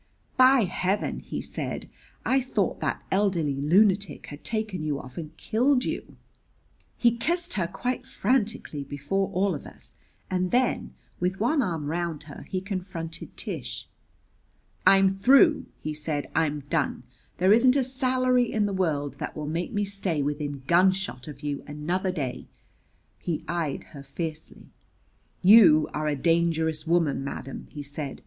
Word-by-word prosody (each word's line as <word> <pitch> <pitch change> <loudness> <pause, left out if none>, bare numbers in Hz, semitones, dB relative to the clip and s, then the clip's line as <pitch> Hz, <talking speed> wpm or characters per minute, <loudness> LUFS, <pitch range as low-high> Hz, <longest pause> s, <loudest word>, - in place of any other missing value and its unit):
"By 255 0 +6
Heaven," 185 +2 -1
he - - -5
said, - - -4 0.4
"I 265 +1 +3
thought 255 - -1
that - - -2
elderly 190 -7 +1
lunatic 190 +3 +3
had 145 0 -10
taken 215 -6 -2
you 150 -2 -1
off 125 0 -11
and 155 -2 -7
killed 250 +4 +2
you!" - - -4 0.8
He 235 -1 +3
kissed 345 +8 -1
her 175 -4 0
quite 250 +7 -3
frantically 220 - -1
before 145 +8 -2
all 190 +1 +1
of 145 - -7
us; - - -13 0.3
and 185 -1 0
then, 240 - 0 0.2
with 180 +2 -1
one 270 +7 +2
arm 165 - -2
round 165 0 -2
her, 145 -1 -11
he 185 -2 -2
confronted 185 -4 -6
Tish. - - -4 1.0
"I'm 195 0 +7
through!" 265 - +5
he 155 - -4
said. 150 -2 -3
"I'm 150 -2 +1
done! 140 - -1 0.3
There 185 +3 +5
isn't 250 +3 +5
a 275 - +3
salary 255 -1 +1
in 215 -2 +1
the 200 - -1
world 150 -7 -1
that - - -5
will 150 - -4
make 165 +6 -2
me 205 -2 0
stay 195 -7 -1
within 145 -1 -3
gunshot 185 -4 +2
of 150 0 -10
you 145 -1 -3
another 175 +6 -1
day." 140 -8 -4 0.7
He 170 -3 -3
eyed 165 -4 -2
her 140 - -8
fiercely. 155 +3 -6 0.7
"You 185 -6 +8
are 155 0 -1
a 150 - +1
dangerous 160 0 +1
woman, 160 -5 +2
madam," 135 -1 -6
he 145 - -7
said. 145 -1 -6
175 Hz, 150 wpm, -26 LUFS, 150-210 Hz, 1.0 s, You